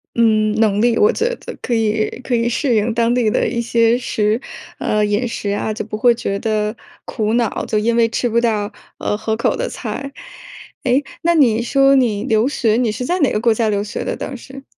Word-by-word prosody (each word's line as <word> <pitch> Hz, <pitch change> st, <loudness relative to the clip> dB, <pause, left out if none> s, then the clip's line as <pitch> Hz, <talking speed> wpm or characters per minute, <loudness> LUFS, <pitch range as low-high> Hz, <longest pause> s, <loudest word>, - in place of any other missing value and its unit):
嗯， 215 Hz, -2 st, +3 dB
能 210 Hz, -1 st, +2 dB
力， 235 Hz, -1 st, +3 dB
我 430 Hz, +3 st, +5 dB
觉 465 Hz, -, -1 dB
得 -, -, -9 dB
可 245 Hz, -, -2 dB
以 220 Hz, -1 st, +1 dB
可 255 Hz, -, -3 dB
以 235 Hz, 0 st, +2 dB
适 245 Hz, +1 st, 0 dB
应 220 Hz, +1 st, +1 dB
当 235 Hz, 0 st, +1 dB
地 245 Hz, -3 st, +2 dB
的 -, -, +1 dB
一 235 Hz, -1 st, -2 dB
些 230 Hz, 0 st, +2 dB
食 215 Hz, -2 st, 0 dB, 0.4 s
呃， 210 Hz, 0 st, +1 dB
饮 210 Hz, +4 st, 0 dB
食 210 Hz, -3 st, -4 dB
啊， 205 Hz, +1 st, -1 dB
就 215 Hz, -, -4 dB
不 215 Hz, 0 st, -6 dB
会 240 Hz, +1 st, +4 dB
觉 200 Hz, -3 st, -3 dB
得 215 Hz, 0 st, -1 dB, 0.3 s
苦 215 Hz, 0 st, -2 dB
恼， 235 Hz, -2 st, 0 dB
就 215 Hz, -, -1 dB
因 230 Hz, +2 st, +1 dB
为 230 Hz, -1 st, +4 dB
吃 235 Hz, +1 st, -1 dB
不 230 Hz, -, +2 dB
到， 215 Hz, -3 st, 0 dB, 0.3 s
呃， 210 Hz, -, -2 dB
合 220 Hz, 0 st, -2 dB
口 230 Hz, -, 0 dB
的 -, -, -2 dB
菜。 275 Hz, 0 st, -6 dB, 0.7 s
诶， 260 Hz, +2 st, +2 dB, 0.2 s
那 340 Hz, 0 st, +3 dB
你 235 Hz, -7 st, +4 dB
说 275 Hz, +3 st, +3 dB
你 230 Hz, -6 st, +1 dB
留 220 Hz, +2 st, +2 dB
学， 230 Hz, -6 st, +1 dB
你 245 Hz, -2 st, +1 dB
是 250 Hz, -, -4 dB
在 360 Hz, +5 st, 0 dB
哪 285 Hz, -, +3 dB
个 210 Hz, -, 0 dB
国 235 Hz, -1 st, +3 dB
家 220 Hz, 0 st, 0 dB
留 205 Hz, -1 st, 0 dB
学 205 Hz, -, -5 dB
的 -, -, -2 dB
当 265 Hz, -, -6 dB
时？ 270 Hz, +3 st, -12 dB
230 Hz, 240 characters per minute, -18 LUFS, 215-245 Hz, 0.7 s, 我